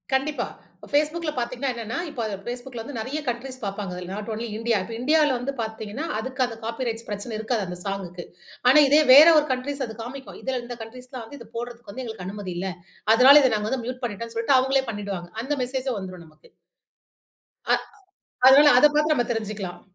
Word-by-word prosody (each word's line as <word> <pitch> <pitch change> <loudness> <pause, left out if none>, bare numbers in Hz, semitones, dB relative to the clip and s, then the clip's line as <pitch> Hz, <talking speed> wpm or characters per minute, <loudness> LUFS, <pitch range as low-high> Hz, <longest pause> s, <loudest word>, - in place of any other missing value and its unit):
கண்டிப்பா. 290 +3 -1 0.5
Facebookல 305 +2 +1
பார்த்தீங்கனா 250 +2 -2
என்னனா, 230 -1 -5
இப்ப 280 -5 -9
அத 210 - -3
Facebookல 245 -1 -6
வந்து 285 0 -8
நிறைய 270 +7 -3
கன்ட்ரீஸ் 255 +2 -5
பார்ப்பாங்க. 195 -1 -4
அதில் 180 +1 -7
நாட் 210 +2 -6
ஒன்லி 230 +2 -4
இந்தியா 230 -1 +1
இப்ப 225 - -8
இந்தியால 300 +2 +3
வந்து 270 +3 -4
பார்த்தீங்கனா 220 +6 -5
அதுக்கு 260 +2 -2
அந்த 230 -2 -6
காப்பி 230 +2 -3
ரைட்ஸ் 230 0 -4
பிரச்சனை 205 +3 -5
இருக்காது 220 -2 -1
அந்த 180 0 -6
சாங்க்கு. 180 -3 -5 0.5
ஆனா, 300 - +7
இதே 295 +3 +6
வேற 295 +4 +11
ஒரு 300 - -1
கன்ட்ரீஸ் 270 +2 -2
அது 220 - -9
காண்பிக்கும். 265 +3 -8
இதில 260 -2 -2
இந்த 240 0 -7
கன்ட்ரீஸ்லாம் 250 +1 -9
வந்து 285 +5 -11
இத - - -12
போட்றதுக்கு 240 -2 -7
வந்து 260 +4 -6
எங்களுக்கு 220 -5 -7
அனுமதி 195 -2 -5
இல்ல. 190 +1 -2 0.4
அதனால 260 +5 +8
இதை 255 - +4
நாங்க 210 0 -2
வந்து 260 -3 -2
மியூட் 255 +1 -5
பண்ணிட்டோன்னு 230 +1 -6
சொல்லிட்டு 260 +4 +4
அவுங்களே 265 0 +1
பண்ணிவிடுவாங்க. 200 -4 -5
அந்த 290 +4 -2
மெசேஜூம் 255 -3 -2
வந்துரும், 185 -3 -8
நமக்கு. 155 0 -22 1.2
அ - - +6 0.7
அதனால 280 +1 +8
அத 295 - +7
பார்த்து 305 +1 +3
நம்ம 240 -3 0
தெரிஞ்சிக்கலாம். 210 -5 -5
240 Hz, 190 wpm, -24 LUFS, 215-265 Hz, 1.2 s, வேற